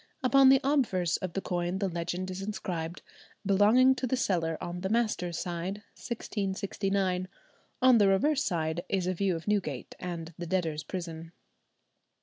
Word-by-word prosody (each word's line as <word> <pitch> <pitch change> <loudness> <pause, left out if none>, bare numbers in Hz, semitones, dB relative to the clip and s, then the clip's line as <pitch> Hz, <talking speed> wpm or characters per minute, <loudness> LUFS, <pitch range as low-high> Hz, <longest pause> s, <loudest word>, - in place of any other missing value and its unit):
Upon 270 +1 +6
the 270 0 +7
obverse 225 - +1
of 185 -2 -5
the 195 - -2
coin 175 0 -2
the 195 0 0
legend 180 +1 -3
is 185 +1 -5
inscribed: 180 -5 -4 0.4
"Belonging 215 +7 +5
to 255 - -1
the 260 - 0
cellar 165 -8 0
on 175 +1 -5
the 190 - -2
master's 215 -7 0
side, 180 +4 -4
1669;" 195 -4 -2 0.6
on 255 -2 +7
the 205 - +5
reverse 270 +10 +3
side 160 -2 -1
is 190 -2 0
a 185 - 0
view 185 0 0
of 165 - -7
Newgate 175 -11 -1
and 170 -2 -5
the 175 - -4
debtors' 160 -4 -1
prison. 165 -2 -6
185 Hz, 155 wpm, -29 LUFS, 175-210 Hz, 0.6 s, the